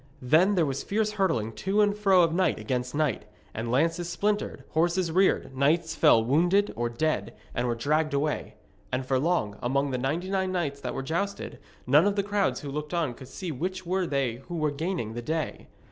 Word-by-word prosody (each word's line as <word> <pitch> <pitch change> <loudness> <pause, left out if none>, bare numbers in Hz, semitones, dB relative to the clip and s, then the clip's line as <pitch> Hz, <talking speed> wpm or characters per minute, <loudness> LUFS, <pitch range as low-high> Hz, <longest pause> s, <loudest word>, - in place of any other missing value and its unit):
Then 165 +10 +4
there 170 -3 +3
was 135 -1 -2
fierce 215 +1 0
hurtling 185 - 0
to 195 - -1
and 205 -1 +3
fro 195 -4 +4
of 165 -1 +1
knight 180 -1 +2
against 125 +4 -3
knight, 145 -8 0 0.3
and 115 +1 -4
lances 165 +6 +1
splintered, 205 +4 -1
horses 170 +2 +1
reared, 185 -6 +2
knights 160 +4 +2
fell 115 -7 +5
wounded 175 - +3
or 120 0 -1
dead, 155 +7 -1 0.2
and 120 +1 -1
were 120 - 0
dragged 155 +6 +1
away. 150 +2 -2 0.4
And 130 +1 -1
for 130 0 +1
long, 140 -10 0
among 140 +3 0
the 125 - -1
ninety 160 +9 -2
nine 190 -1 0
knights 150 -6 -2
that - - -4
there 135 - -3
jousted, 195 +8 -3 0.3
none 150 +9 +5
of 205 - +1
the 200 - +1
crowds 205 -1 0
who 140 - -6
looked 150 +3 -4
on 160 -7 0
could 130 +2 -12
see 180 +5 -5
which 185 +6 -4
were 185 +1 0
they 135 -5 -1
who 175 - -5
were 155 -2 +1
gaining 155 - -3
the 120 - -4
day. 155 +3 -3
160 Hz, 205 wpm, -27 LUFS, 135-185 Hz, 0.4 s, fell